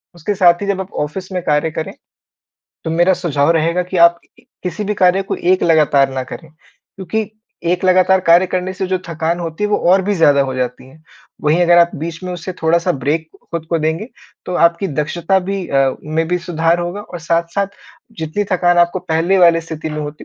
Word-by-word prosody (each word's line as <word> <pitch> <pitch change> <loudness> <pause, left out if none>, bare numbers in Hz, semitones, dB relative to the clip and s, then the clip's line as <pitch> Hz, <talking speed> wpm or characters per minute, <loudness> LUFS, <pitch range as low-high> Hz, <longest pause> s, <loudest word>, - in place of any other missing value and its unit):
उसके 175 +5 -3
साथ 175 0 +4
ही 200 - -3
जब 195 -1 -1
आप 190 - -9
ऑफ़िस 185 +5 -8
में 180 -1 -2
कार्य 150 +2 +1
करें, 155 - -5 0.9
तो 160 - -2
मेरा 175 +3 +3
सुझाव 145 -4 0
रहेगा 170 +2 +1
कि 180 +1 -5
आप 170 0 +5 0.4
किसी 190 +3 -4
भी 210 +1 -2
कार्य 185 +1 +3
को 195 - -4
एक 185 +1 +1
लगातार 145 -4 +3
ना 130 -1 -3
करें, - - -10 0.5
क्योंकि 200 +3 -3 0.4
एक 180 +1 -2
लगातार 185 0 +4
कार्य 175 +2 +4
करने 185 +1 -2
से 190 0 -3
जो 185 0 -1
थकान 165 +1 -2
होती 165 +3 -4
है, 210 - -1
वो - - +3
और 190 +1 +4
भी 205 +2 0
ज़्यादा 145 -5 +4
हो 130 -1 -4
जाती 125 0 -4
है। 155 +4 -19 0.4
वहीं 155 +4 +2
अगर 175 0 +5
आप 170 0 +5
बीच 165 +3 -6
में 180 - -4
उससे 180 +1 -6
थोड़ा-सा 170 +2 +2
ब्रेक 155 +3 -2 0.2
खुद 165 -2 -3
को 165 - +1
देंगे, 160 +9 -2 0.4
तो 180 - -3
आपकी 170 +3 +2
दक्षता 165 +5 0
भी 190 0 -4
अ, 135 -1 +1
में 160 +2 -1
भी 180 +1 0
सुधार 170 -1 0
होगा 175 +4 -4
और 195 -4 -9
साथ-साथ 170 +4 -1 0.5
जितनी 160 +6 -2
थकान 175 -1 +2
आपको 175 +1 +3
पहले 170 +4 0
वाली 170 -2 +5
स्थिति 160 -1 -6
में 150 - -5
होती, 150 +1 -7
170 Hz, 210 wpm, -17 LUFS, 160-185 Hz, 0.9 s, आप